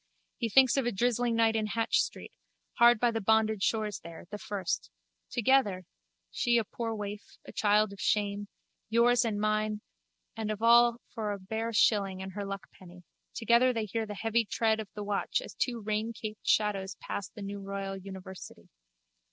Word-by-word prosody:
He 230 - -1
thinks 260 +3 +5
of 265 -3 +1
a - - +1
drizzling 240 +2 +1
night 225 -1 +3
in 215 -1 0
Hatch 225 +1 +1
street, - - -6 0.5
hard 235 -1 +7
by 240 0 +3
the 225 -1 -2
bonded 220 0 +2
stores 215 -1 0
there, 170 0 -11
the 210 - -5
first. 200 - -3 0.4
Together 225 -7 +2 0.5
(she 240 - +1
is - - +4
a 215 - -13
poor 230 -1 -2
waif, 205 0 -7
a - - -9
child 210 -1 +2
of 200 - -10
shame, 205 -1 0 0.4
yours 235 +2 +4
and 215 -3 -1
mine 215 0 0 0.5
and 220 -1 -3
of 215 -1 -2
all 235 +1 +6
for 215 -3 -2
a 200 - -6
bare 220 +4 -3
shilling 200 -4 +2
and 190 0 -6
her 200 +1 -5
luckpenny), 185 -2 -9 0.3
together 235 +3 +4
they 225 -2 -1
hear 220 +2 -3
the 210 - -6
heavy 225 +2 +1
tread 220 +1 +1
of 215 -2 -6
the 210 - -4
watch 205 - -1
as - - -9
two 240 -2 -1
raincaped 215 0 -4
shadows 200 -3 +1
pass 200 - -5
the 210 - -10
new 200 0 -5
royal 195 0 -4
university. 190 -1 -10
215 Hz, 180 wpm, -30 LUFS, 200-230 Hz, 0.5 s, hard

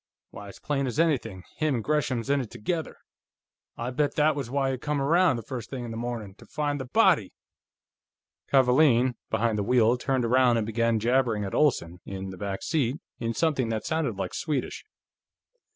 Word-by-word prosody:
Why, 100 - -9
it's - - -12
plain 140 -2 -1
as 130 +5 -3
anything; 120 - 0
him 155 -3 +1
and 115 - -2
Gresham's 130 -5 0
in 140 -1 +2
it 120 - -7
together. 160 +8 -4 0.8
I 120 +2 -3
bet 145 +3 0
that 155 -1 +3
was 135 -5 -4
why 135 0 0
he 130 - -4
come 150 +1 -2
around, 165 +2 +3
the 115 - -5
first 120 -3 -6
thing 130 -3 -5
in 115 - -6
the - - -6
morning, 115 -4 -5
to - - -15
find 145 -2 -2
the - - -5
body!" 170 - +3 1.2
Kavaalen, 130 -1 +4 0.2
behind 110 -2 0
the - - 0
wheel, 120 +2 +3
turned 130 -2 0
around 125 0 +4
and 110 - 0
began 115 +1 +1
jabbering 115 -2 +1
at 95 - -6
Olsen, 90 - +1
in 95 0 -6
the 95 - -9
back 100 0 -4
seat, 145 -3 0 0.2
in 115 -1 -2
something 145 -8 +1
that 110 -1 -3
sounded 160 -8 -1
like - - -4
Swedish. 150 -6 -3
125 Hz, 190 wpm, -27 LUFS, 115-145 Hz, 1.2 s, Kavaalen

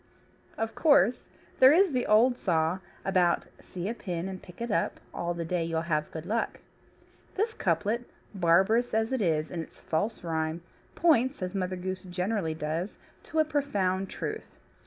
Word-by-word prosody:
Of 225 0 -2
course 250 - +4 0.3
there 260 +1 +9
is 365 +3 +5
the 250 -2 0
old 235 +4 +5
saw 170 -4 +1 0.3
about 180 -3 +3 0.2
see 180 0 -6
a 225 - -1
pin 180 -6 -4
and 190 -1 -6
pick 180 - -14
it 235 -1 -3
up, - - 0
all 175 0 -2
the 170 -1 -3
day 175 0 0
you'll 165 -1 -1
have 155 -3 -1
good 160 0 -7
luck. 225 +5 -1 0.8
This 440 +3 0
couplet, 210 - 0 0.2
barbarous 195 +7 +3
as 220 +1 +1
it 260 -3 0
is 155 -4 +1
in 170 - -3
its 160 - -11
false 190 +8 -2
rhyme, 160 0 -2 0.3
points 270 - +3
(as 180 +1 -3
Mother 185 -1 -1
Goose 185 +1 -4
generally 180 -2 -2
does) 160 +5 -3 0.3
to 320 - -6
a 315 - +5
profound 200 -11 0
truth. - - -6
185 Hz, 170 wpm, -29 LUFS, 170-230 Hz, 0.8 s, there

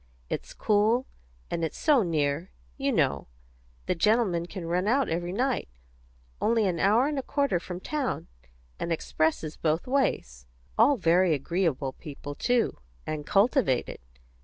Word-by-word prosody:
It's - - -4
cool; 220 +4 +2 0.5
and 165 - -1
it's 160 - -3
so 295 -5 +4
near, 155 -2 0 0.3
you - - 0
know; - - +1 0.6
the - - +1
gentlemen 185 -2 +2
can 180 -2 -7
run 180 +4 0
out 265 +4 +2
every 175 +2 -2
night 250 - -1 0.7
only 225 -1 +3
an 175 -3 0
hour 215 +8 +4
and 295 -1 -1
a - - -1
quarter 280 - 0
from 180 0 -7
town, 280 +4 -2 0.5
and 170 - -3
expresses 160 -1 -1
both 160 +1 0
ways. 65 - -1 0.3
All 255 +5 +5
very 175 -2 +3
agreeable 145 -3 -1
people, 145 -1 -8
too; 245 +10 0 0.3
and 150 -1 -4
cultivated. 205 - +2
180 Hz, 140 wpm, -27 LUFS, 160-235 Hz, 0.7 s, All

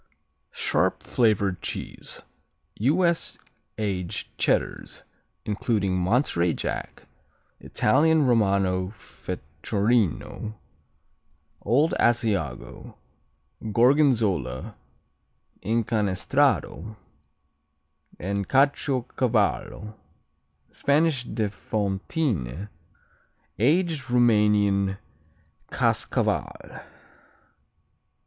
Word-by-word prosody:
Sharp - - 0
flavored 100 -6 +1
cheese - - -6 0.5
U.S. 170 - +1 0.4
aged 95 -5 -3
Cheddars, - - -1 0.4
including 105 -2 0
Monterey 90 - +1
Jack; - - -5 0.5
Italian 150 +6 +2
Romano 100 -6 +2
Fecorino, 105 - -2 1.1
Old 140 +10 +2
Asiago, 105 - -1 0.8
Gorgonzola, 115 - +2 0.9
Incanestrato 110 - 0 1.2
and 100 +1 -3
Caciocavallo; 125 -6 0 0.8
Spanish 145 -3 +1
de 110 -2 -1
Fontine; 100 - -2 0.9
Aged 155 - +1
Roumanian 105 -5 +3 0.7
Kaskaval. - - -1
110 Hz, 50 wpm, -25 LUFS, 95-130 Hz, 1.2 s, Roumanian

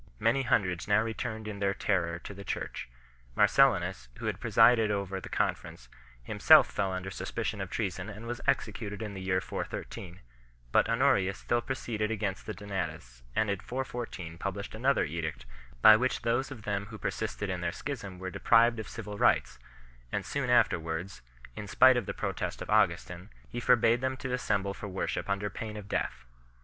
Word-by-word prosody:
Many 115 +5 +3
hundreds 95 -9 +1
now 105 +1 +4
returned 110 -1 -4
in 105 -2 -5
their 100 -1 +1
terror 85 -4 0
to - - -7
the 100 0 -9
Church. 90 - -4 0.5
Marcellinus, 95 - +3
who - - -7
had - - -2
presided 115 -1 +5
over 100 -2 -2
the - - -9
Conference, 60 - -2 0.3
him - - -6
self - - +8
fell 100 -2 -2
under 95 +1 -4
suspicion 105 +3 -3
of 95 - -4
treason 95 -2 -3
and 105 +2 -9
was 120 +1 -5
executed 105 0 -1
in 105 -2 -5
the 95 - -6
year 95 0 +1
413, 90 -1 -6 0.5
but - - +4
Honorius 115 -6 +2
still 120 0 0
proceeded 115 -5 -2
against 105 -4 -3
the - - -3
Donatists; 90 -12 -5
and 110 -2 +2
in 100 - -2
414 120 -10 -5
published 100 +2 -4
another 130 +5 +2
edict 80 -5 -4 0.4
by 110 - +11
which 125 +4 0
those 120 +4 +1
of 120 -6 -9
them 100 -1 -2
who 110 0 -9
persisted - - -3
in - - -3
their - - -1
schism 95 -3 -6
were 95 0 -5
de - - -7
prived 115 0 +5
of 110 - -6
civil 105 -2 -7
rights; - - +2 0.5
and - - -2
soon - - -2
afterwards, 80 0 +1 0.3
in 105 - -6
spite 130 +6 +6
of 120 -5 -1
the - - -2
protest - - -3
of - - -7
Augustin, 90 +3 +1 0.2
he 120 - -4
forbade 120 -1 +4
them 130 0 -1
to 130 -1 -4
assemble 100 -6 0
for 105 - -7
worship 95 +1 -3
under 100 +1 0
pain 110 +1 -6
of 105 -2 -8
death 65 -9 -2
*. - - -32
105 Hz, 185 wpm, -30 LUFS, 95-115 Hz, 0.5 s, by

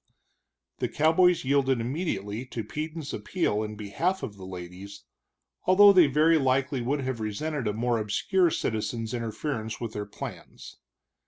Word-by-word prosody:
The - - -1
cowboys 165 +1 +3
yielded 135 -2 +2
immediately 115 - -3
to 115 -3 -5
Peden's 155 +5 -5
appeal 135 - -1
in 105 0 -4
behalf 165 - -2
of 110 -6 -5
the 95 -1 -10
ladies, 95 +2 -9 0.6
although 200 +2 +8
they 180 -5 +7
very 155 +4 +4
likely 135 0 +1
would 140 +4 -1
have 130 -3 -3
resented 120 +5 -3
a 105 - 0
more 120 +1 0
obscure 170 - +2
citizen's 115 -3 -2
interference 115 0 -3
with 115 -2 -5
their 105 -1 -4
plans. - - -9
130 Hz, 145 wpm, -27 LUFS, 110-155 Hz, 0.6 s, although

